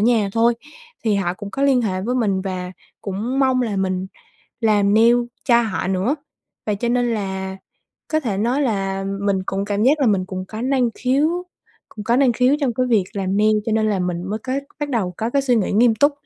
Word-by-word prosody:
nhà 220 -2 +3
thôi 235 +2 +3 0.5
thì 215 -2 +2
họ 185 -3 0
cũng 205 0 -8
có 275 - -3
liên 270 -3 +4
hệ 185 -4 -1
với 235 +6 -2
mình 205 -6 +1
và 185 -1 -4 0.3
cũng 215 +7 -3
mong 260 -2 +3
là 215 -4 -2
mình 185 -1 -1 0.5
làm 205 -3 +3
nail 230 +2 +6 0.3
cho 235 -2 +5
họ 215 -5 -2
nữa. 190 +10 0 0.5
Vậy 210 - 0
cho 235 +4 -2
nên 240 -1 +1
là, 190 -2 -4 0.5
có 310 - +1
thể 225 -10 -2
nói 240 +7 +1
là 195 -6 -1 0.2
mình 200 -1 +1
cũng 195 +1 -2
cảm 205 0 -1
giác 285 +5 +4
là 270 - +3
mình 195 -4 +2
cũng 185 0 -5
có 220 +2 -6
năng 255 -1 +1
khiếu 265 +4 +2 0.6
cũng 210 - -8
có 235 +1 +3
năng 260 -2 +4
khiếu 255 +4 +3
trong 260 -4 +1
cái 255 +2 0
việc 220 -5 +4
làm 195 -1 -1
nail, 215 +1 +4
cho 225 - -1
nên 215 0 +2
là 200 -2 0
mình 180 -1 -1
mới 215 +2 -2
có 260 - -3 0.3
bắt 295 -1 -2
đầu 210 -9 -1
có 225 - -1
cái 280 +3 +1
suy 255 -3 +2
nghĩ 215 -5 0
nghiêm 225 +2 +4
túc 285 +7 +4
220 Hz, 225 wpm, -21 LUFS, 195-245 Hz, 0.6 s, nail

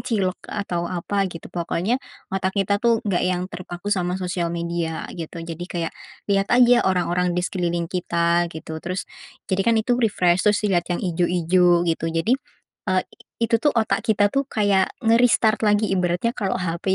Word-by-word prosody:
cilok 195 -5 -1
atau 175 -4 -3
apa, 195 +2 -1
gitu. 175 +1 -10
Pokoknya 180 +8 -1 0.3
otak 190 +1 -1
kita, 200 +1 +1
tuh, 230 -1 +2
nggak 195 -4 +1
yang 180 0 -1
terpaku 180 +2 -4
sama 180 -2 0
sosial 180 -2 -2
media, 170 -1 -3
gitu. 165 0 -7
Jadi, 170 +1 -6
kayak, 170 -2 -3 0.4
liat 195 0 +1
aja 245 0 +6
orang-orang 180 -1 0
di 180 - 0
sekeliling 175 -2 -1
kita, 170 -1 +1
gitu. 160 -1 -7
Terus 185 +3 -4 0.5
jadi, 190 - +2
kan, 230 - +4
itu 240 +3 +1
refresh. 185 -4 +2
Terus 210 +1 +1
lihat 180 -4 +1
yang 175 +1 -2
ijo-ijo, 175 0 +2
gitu. 165 -1 -1
Jadi, 165 +8 0 0.6
eee, 185 0 +2 0.4
itu, 230 0 +3
tuh, 295 +4 +1
otak 225 -2 0
kita, 205 -2 +3
tuh, 275 0 0
kayak 205 -6 +1
nge-restart 225 -1 +4
lagi, 210 0 +2
ibaratnya 180 +4 +1
kalau 195 -5 -2
hape 180 +1 -1
185 Hz, 165 wpm, -22 LUFS, 175-205 Hz, 0.6 s, aja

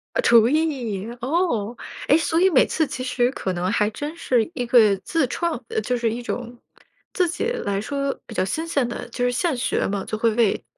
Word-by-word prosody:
呃 - - +3
厨 230 - +6
艺， 260 -10 -1
哦。 245 - 0 0.3
哎， 295 - +6
所 325 0 +1
以 380 - +6
每 280 - +5
次 315 - +1
其 255 - -5
实 250 0 +1
可 190 -8 -3
能 180 +2 -1
还 210 -2 +2
真 290 +8 -5
是 245 -4 +1
一 245 - -2
个 225 -4 +5
自 325 - 0
创， 315 -2 -2
呃 - - -1
就 245 +4 -1
是 235 -2 0
一 240 +2 -4
种 240 0 -5 0.6
自 360 -2 +2
己 345 - -2
来 460 - -1
说 275 +5 -2
比 - - -10
较 - - +1
新 315 - -3
鲜 280 -7 +1
的 240 +1 -6
就 245 +1 -3
是 245 - +2
现 310 +3 0
学 245 - 0
嘛， 195 -1 -2
就 215 - -3
会 230 +1 +2
为 220 -2 +1
245 Hz, 235 characters per minute, -23 LUFS, 220-310 Hz, 0.6 s, 厨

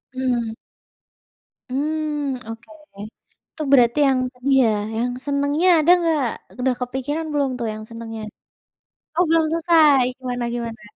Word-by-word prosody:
Mhm. 240 -4 -1 1.1
Mmm, 295 -1 -2
oke. 225 0 -9 0.8
Itu - - -9
berarti 245 +1 +5
yang 265 -1 +2
sedih 260 +2 0
ya, 220 - +3 0.3
yang 245 +2 0 0.2
senangnya 285 +4 +1
ada 310 +3 +4
nggak, 325 -5 +1 0.4
udah 255 0 +1
kepikiran 265 +6 -3
belum 285 -2 +1
tuh 230 - -2
yang 215 - -8
senengnya? 230 -1 -7 0.9
Oh 355 - +4
belum 325 -1 +3
selesai, 315 -5 +4
gimana 250 -2 -4
gimana? 230 -2 -5
265 Hz, 125 wpm, -21 LUFS, 240-305 Hz, 1.1 s, berarti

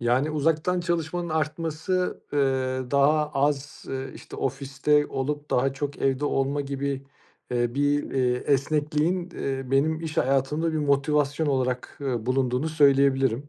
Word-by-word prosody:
Yani, 125 +5 +2
uzaktan 160 +4 +1
çalışmanın 170 0 -2
artması, 160 +3 -1
eee, 145 - +1 0.5
daha 150 +2 +3
az, 145 0 -1
ııı, 135 0 -4
işte, - - -10
ofiste 140 +2 +1
olup 145 +2 -3
daha 135 +2 +2
çok 145 +1 -4
evde 135 +1 0
olma 140 0 0
gibi, 140 -1 -3 0.5
eee, 120 -1 0
bir 145 +1 +1
eee 125 -2 +2
esnekliğin, 150 +5 +1
eee, 135 -5 -4
benim 155 +4 +2
iş 160 -1 -5
hayatımda 145 +4 +1
bir 155 - 0
motivasyon 145 +1 +1
olarak, 130 -3 -1
ııı, 125 -5 -2
bulunduğunu 130 +2 +1
söyleyebilirim. 140 -3 +3
140 Hz, 135 wpm, -26 LUFS, 135-155 Hz, 0.5 s, daha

